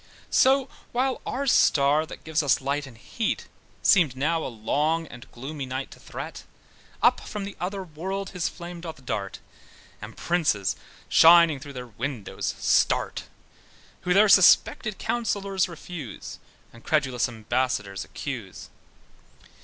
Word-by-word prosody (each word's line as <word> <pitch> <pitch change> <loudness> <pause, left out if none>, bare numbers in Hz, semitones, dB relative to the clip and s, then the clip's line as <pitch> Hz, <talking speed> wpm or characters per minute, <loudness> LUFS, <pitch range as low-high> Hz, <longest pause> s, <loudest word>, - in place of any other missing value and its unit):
So 265 0 +4 0.3
while 255 +2 0
our 275 +2 -2
star 150 - +4
that - - -10
gives 160 0 0
us 145 -3 +2
light 140 +1 -2
and 120 -4 -14
heat, 220 - -3 0.4
Seemed 165 -10 +4
now 160 +4 0
a - - -3
long 150 +8 0
and 125 -5 -13
gloomy 135 +2 -6
night 130 +1 -4
to - - -13
threat, - - -8 0.6
Up - - +5
from 210 - -6
the 200 0 -7
other 195 +2 -3
world 190 +4 -5
his 180 -3 -2
flame 175 -1 -9
he 165 -1 -5
darts, 100 -5 -4 0.6
And - - -9
princes 155 - +1 0.3
(shining 165 -3 +7
through 140 +1 -10
their 125 -1 -6
windows) 120 -1 -4
starts, - - +1 0.7
Who 180 - -3
their 210 +2 +6
suspected 195 +1 +5
counsellors 200 -5 -1
refuse, 160 - -8 0.3
And 115 - -15
credulous 135 -6 +1
ambassadors 110 -4 -2
accuse. 115 -10 -7
155 Hz, 135 wpm, -26 LUFS, 130-185 Hz, 0.7 s, shining